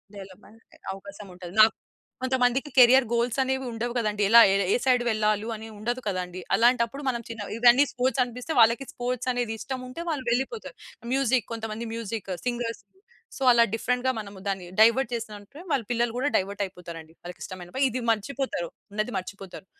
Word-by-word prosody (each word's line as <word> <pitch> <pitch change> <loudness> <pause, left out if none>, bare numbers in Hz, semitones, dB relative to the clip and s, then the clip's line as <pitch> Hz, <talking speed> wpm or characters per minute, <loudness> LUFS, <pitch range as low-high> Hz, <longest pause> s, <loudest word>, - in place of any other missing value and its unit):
Development 200 +3 -13 0.3
అవకాశం 200 +1 -11
ఉంటది. 180 0 -10
నాకు 220 - +7 0.5
కొంతమందికి 260 +2 +1
కేరియర్ 255 +1 +7
గోల్సనేవి 260 +3 0
ఉండవు 235 +1 -3
గదండీ! 210 -2 0
ఎలా 235 +1 +9 0.3
ఏ - - +4
సైడ్ 250 -2 +3
వెళ్ళాలి 215 0 +1
అని 220 +1 -9
ఉండదు 240 +4 -3
కదండీ! 185 -1 -3
అలాంటప్పుడు 240 +3 +2
మనం 235 -2 -2
చిన్న 225 -3 -6
ఇవన్నీ 245 +4 +6
స్పోర్ట్స్ 255 +1 0
అనిపిస్తే, 250 +5 -7
వాళ్ళకి 230 +4 +5
స్పోర్ట్స్ 250 +1 -3
అనేది 240 -2 -2
ఇష్టముంటే 260 +4 -6
వాళ్ళు 275 -5 -3
వెళ్ళిపోతారు. 270 - -2 0.4
మ్యూజిక్, 260 -2 +1
కొంతమంది 225 0 -5
మ్యూజిక్ 225 -3 -5 0.2
సింగర్స్. 240 -1 -2 0.6
సో, 270 - -4
అలా 235 -1 +6
డిఫరెంట్‌గా 250 +3 0
మనము 200 -2 -9
దాన్ని 190 -2 -2
డైవర్ట్ 230 +2 +5
జేసామంటే 215 +4 -8
వాళ్ళ 255 - +1
పిల్లలు 240 -1 +1
గూడా 275 +3 0
డైవర్టయిపోతారండి. 180 -5 -5
వాళ్ళకి 175 0 -9
ఇష్టంమైనా 180 -1 -9
పని. 270 +1 +2
ఇది 255 +1 -3
మర్చిపోతారు. 225 -5 -3 0.2
ఉన్నది 215 +2 -2
మర్చిపోతారు. 190 0 -8
235 Hz, 150 wpm, -26 LUFS, 205-255 Hz, 0.6 s, ఎలా